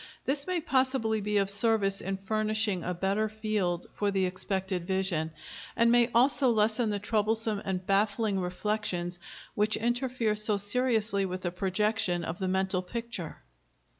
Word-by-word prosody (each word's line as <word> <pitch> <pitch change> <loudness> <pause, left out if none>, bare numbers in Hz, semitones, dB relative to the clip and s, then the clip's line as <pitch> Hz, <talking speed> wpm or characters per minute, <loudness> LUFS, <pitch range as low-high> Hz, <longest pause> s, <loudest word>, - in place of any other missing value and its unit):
This 280 +3 0
may 365 -1 0
possibly 260 -7 +1
be 210 +1 0
of 195 -1 +2
service 200 -1 +1
in 195 0 -3
furnishing 215 -1 0
a 180 - -2
better 195 +4 0
field 210 -5 -1
for 205 - -1
the 195 -1 +1
expected 185 -1 -2
vision, 190 -4 0 0.4
and 230 0 +4
may 240 0 +4
also 260 +2 +4
lessen 220 0 +2
the 205 - 0
troublesome 215 0 0
and 185 -1 -2
baffling 205 +1 +1
reflections 180 -1 -2 0.3
which 210 +1 +1
interfere 240 -1 0
so 210 0 0
seriously 210 -1 +1
with 185 -1 -3
the 175 - -1
projection 190 -1 0
of 165 - -5
the 190 - -1
mental 190 0 +1
picture. 205 - -6
210 Hz, 150 wpm, -29 LUFS, 190-225 Hz, 0.4 s, and